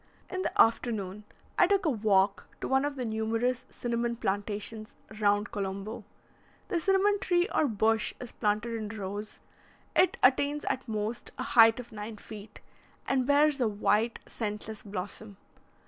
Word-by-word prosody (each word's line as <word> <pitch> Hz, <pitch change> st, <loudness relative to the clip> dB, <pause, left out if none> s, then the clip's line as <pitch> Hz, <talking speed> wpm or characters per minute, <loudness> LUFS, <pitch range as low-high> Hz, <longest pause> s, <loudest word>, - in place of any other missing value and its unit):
In 370 Hz, -1 st, -2 dB
the -, -, -3 dB
afternoon 210 Hz, -3 st, +2 dB, 0.3 s
I -, -, +7 dB
took 395 Hz, -1 st, +2 dB
a -, -, +4 dB
walk 200 Hz, -4 st, +2 dB
to -, -, -3 dB
one 265 Hz, +1 st, +2 dB
of 290 Hz, -1 st, -2 dB
the 255 Hz, -2 st, -3 dB
numerous 225 Hz, +3 st, -1 dB
cinnamon 235 Hz, 0 st, -2 dB
plantations 210 Hz, +1 st, -3 dB, 0.2 s
round 205 Hz, 0 st, +2 dB
Colombo. 200 Hz, +3 st, -4 dB, 0.7 s
The 345 Hz, -, +1 dB
cinnamon 390 Hz, +3 st, +3 dB
tree 355 Hz, -1 st, +2 dB
or 305 Hz, -, +3 dB
bush 220 Hz, -1 st, +1 dB
is 245 Hz, -, -8 dB
planted 215 Hz, +2 st, -1 dB
in 215 Hz, -2 st, -4 dB
rows; 205 Hz, +2 st, -5 dB, 0.6 s
it 370 Hz, -, +4 dB
attains 285 Hz, +3 st, +3 dB
at 260 Hz, -, -2 dB
most 215 Hz, +1 st, -3 dB
a -, -, -2 dB
height 225 Hz, 0 st, +6 dB
of 245 Hz, -, -9 dB
nine 215 Hz, 0 st, -7 dB
feet, 210 Hz, 0 st, -11 dB, 0.5 s
and 260 Hz, -2 st, +1 dB
bears 290 Hz, -1 st, +4 dB
a 240 Hz, -, +3 dB
white, 215 Hz, +2 st, +1 dB
scentless 210 Hz, -1 st, -5 dB
blossom. 200 Hz, +1 st, -6 dB
225 Hz, 150 wpm, -29 LUFS, 210-255 Hz, 0.7 s, I